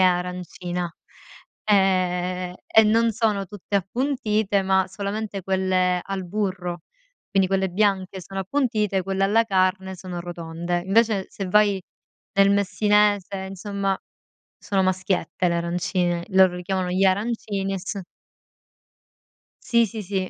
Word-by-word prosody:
arancina, 180 -1 -1 0.7
ehm, 185 -2 +1
e 220 - +6
non 230 +2 +3
sono 210 -3 0
tutte 205 0 -3
appuntite, 215 -2 0
ma 190 0 +2
solamente 200 0 -4
quelle 185 -1 +1
al 195 -2 -4
burro. 180 -3 -3 0.5
Quindi, 195 -2 +2
quelle 190 0 +1
bianche 190 -1 0
sono 195 +2 -5
appuntite, 210 -3 0
quelle 195 +1 0
alla 225 +3 +3
carne 190 -1 0
sono 180 -1 -6
rotonde. 170 0 -4
Invece, 215 -1 +3
se 195 - -5
vai 205 -1 +3 0.5
nel 195 0 +5
messinese, 200 -1 +2
insomma, 195 0 -2 0.6
sono 195 -2 0
maschiette 185 -1 0
le 170 - 0
arancine. 175 0 -1
Loro 190 -1 +5
li 180 - -6
chiamano 185 0 -1
“gli 185 +2 +2
arancini” 200 0 0
e - - -2
s 195 +2 -5 1.6
Sì, 235 -1 +3
sì, 220 0 -6
sì. 195 +1 -5
190 Hz, 125 wpm, -24 LUFS, 180-205 Hz, 1.6 s, e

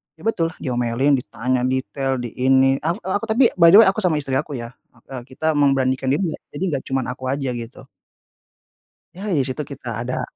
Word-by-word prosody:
Ya 160 - -18
betul 170 -7 +1
diomelin, 125 +2 0
ditanya 125 +1 -2
detail 135 +1 -2
di 120 -2 -6
ini, 135 +1 +3
ak 165 +3 -2
aku 195 +4 -2
tapi 235 +3 +3
by 170 - +8
the 205 - +10
way - - +3
aku 195 +3 -2
sama 180 -5 +2
istri 140 -2 -3
aku 150 -1 -5
ya, 120 0 -7 0.4
e 135 - -7
kita 155 +4 -1
memberanikan 135 -2 +2
diri 155 - 0
ya - - -7 0.2
jadi 145 - -3
enggak 140 -3 -2
cuman 135 -2 -1
aku 125 - -10
aja 135 -2 -2
gitu. 120 -1 -8 1.3
Ya 195 - -8
di 155 - +2
situ 130 +3 -2
kita 125 -5 -6
ada 125 +1 -3
135 Hz, 195 wpm, -21 LUFS, 130-155 Hz, 1.3 s, the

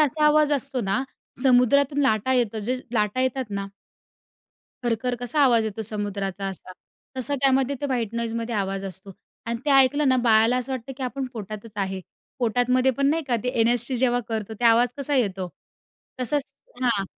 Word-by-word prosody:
असा 300 +1 +2
आवाज 300 0 +4
असतो 275 -2 0
ना 200 +3 0 0.4
समुद्रातून 270 +2 +4
लाटा 260 -1 +2
येतो. 235 -4 +1
जे 235 +5 -1 0.2
लाटा 210 +2 +1
येतात 260 0 0
ना 200 -1 -3 1.2
खरं-खरं 245 +1 -1
कसा 245 +5 -1
आवाज 235 -4 +4
येतो 220 0 -4
समुद्राचा 200 -2 -3
असा, 185 -1 -7 0.4
तसा 260 +3 -1
त्यामध्ये 270 0 +2
ते 285 - -1
व्हाईट 235 -5 -2
नॉईजमध्ये 230 0 -2
आवाज 195 -1 -2
असतो 190 +1 -6 0.3
आणि 230 0 -2
ते 295 - +1
ऐकलं 275 +1 +5
ना 260 - +4
बाळाला 230 0 +4
असं 255 +1 -3
वाटतं 260 +1 -5
की 270 - -7
आपण 260 +1 -3
पोटातच 215 -1 -8
आहे. 190 -1 -2 0.4
पोटातमध्ये 250 +2 +2
पण 275 +3 0
नाही 325 +1 0
का 240 - +2
ते 250 - -2
एन-एस-सी 240 +2 +2
जेव्हा 245 0 +2
करतो 220 -1 -4
ते - - -1
आवाज 235 +1 +5
कसा 285 +1 -1
येतो? 195 -7 0 0.7
तसंच 275 +3 -1 0.3
हां 230 -6 +2
240 Hz, 170 wpm, -24 LUFS, 215-265 Hz, 1.2 s, ऐकलं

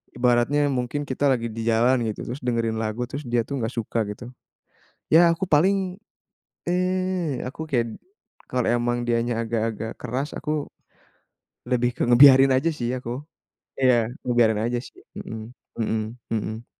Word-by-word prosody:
ibaratnya 125 +4 +2
mungkin 130 +3 -2
kita 140 +2 0
lagi 120 -2 0
di 115 +1 -5
jalan 120 +2 +3
gitu, 105 - -6
terus 130 +4 -5
dengerin 115 -2 0
lagu 110 +2 -2
terus 145 +2 -5
dia 120 -1 +1
tuh 140 - -3
nggak 115 +1 -2
suka 115 -1 -1
gitu, 120 +4 -9 0.9
ya 170 +1 +7
aku 170 +3 -1
paling, 185 +4 +2 0.7
eee, 180 -5 0
aku 155 +4 -6
kayak 115 -4 -1 0.5
kalau 125 -1 0
emang 120 0 +1
dianya 115 0 0
agak-agak 115 -1 -2
keras 130 +4 -3
aku 150 -1 -2 1.0
lebih 125 -1 +2
ke - - -1
ngebiarin 135 +1 +8
aja 165 +6 +1
sih 120 -4 -3
aku 125 +1 -5 0.6
iya 120 -3 +4 0.2
ngebiarin 115 -3 +3
aja 120 +1 0
sih, - - -14 0.2
mhm 110 0 -7 0.3
mhm 110 0 0 0.3
mhm. 110 +2 -4
120 Hz, 145 wpm, -24 LUFS, 115-145 Hz, 1.0 s, ngebiarin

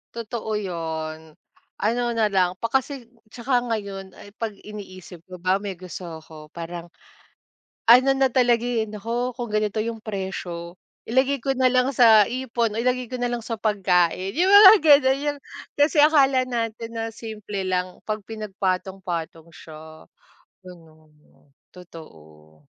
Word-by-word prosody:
Totoo 230 -1 -5
'yon, 160 -4 -5 0.4
ano 235 +4 0
na 220 -2 +2
lang 185 -1 +1
pa 230 - -1
kasi 265 -2 -2 0.2
'tsaka 245 +2 -1
ngayon 195 -3 -5
ay 205 - -13
'pag 220 -2 -5
iniisip 185 -5 -11
ko 185 -1 -9
ba 185 +2 +1
may 200 -2 -5
gusto 175 -2 -8
ko 155 -1 -13
parang, 170 0 -7 1.0
ano 255 +3 +7
na 270 0 +2
talaga 240 -2 +2
eh, 230 -3 0
"Nako 235 +4 -3
kung 240 -3 -5
ganito 215 0 -1
yung 225 0 -4
presyo 185 -4 -6 0.3
ilagay 260 +4 +1
ko 270 +3 -1
na 255 -1 +3
lang 255 0 +2
sa 220 -4 +6
ipon 235 -3 -2
o - - -2
ilagay 250 0 0
ko 255 - -6
na 245 0 -2
lang 240 - -2
sa 225 0 -4
pagkain," 190 - 0
yung 365 +4 +2
mga 405 0 +10
gano'n, 280 -3 +5
yung 285 - -14 0.4
kasi 295 +1 +4
akala 275 -4 +4
natin 230 -2 -4
na 225 0 -3
simple 210 -4 -6
lang 185 -1 -2
'pag 215 0 -3
pinagpatong 195 -3 -3
patong 165 -2 -5
siya 155 0 -13 0.7
ano - - -9
'no, 155 -2 -24 0.2
totoo. 80 - -15
215 Hz, 150 wpm, -23 LUFS, 180-245 Hz, 1.0 s, mga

